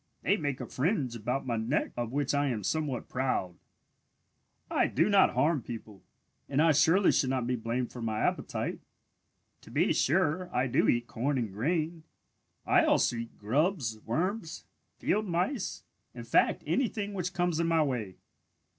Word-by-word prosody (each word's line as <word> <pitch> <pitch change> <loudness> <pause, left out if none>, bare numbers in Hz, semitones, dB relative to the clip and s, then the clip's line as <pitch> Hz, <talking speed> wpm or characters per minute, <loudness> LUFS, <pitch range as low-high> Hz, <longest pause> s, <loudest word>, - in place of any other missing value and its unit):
They 200 - +3
make 145 -9 -2
a - - -4
fringe 135 - -1
about 125 +5 -2
my 120 -3 -1
neck 115 +7 0
of 120 -1 -3
which 140 0 0
I 145 0 +2
am 115 -6 -2
somewhat 145 -1 -2
proud. 125 -8 -1 1.1
"I - - +2
do 165 +8 +1
not 195 -9 +4
harm 145 +3 +2
people, 110 -4 -9 0.5
and 140 - 0
I 160 +1 +5
surely 165 +6 +4
should 130 - +1
not 130 -2 0
be 125 +1 0
blamed 120 +1 -2
for 125 - -8
my 110 -1 -2
appetite. - - -1 0.8
To - - -15
be - - +2
sure, 180 +4 +1
I 125 +1 +1
do 125 - +2
eat 120 0 +2
corn 135 +5 -1
and 115 -6 -2
grain. 160 - -1 0.6
I - - +4
also - - +3
eat 115 0 -7
grubs, 130 - 0
worms, 170 - -2 0.3
field 215 0 0
mice, 185 +7 -2 0.3
in - - -7
fact - - +2
anything 210 -5 -1
which 180 -2 -2
comes 175 -2 +1
in 170 - +1
my 165 -1 +3
way. 115 -10 -3
140 Hz, 165 wpm, -30 LUFS, 120-170 Hz, 1.1 s, I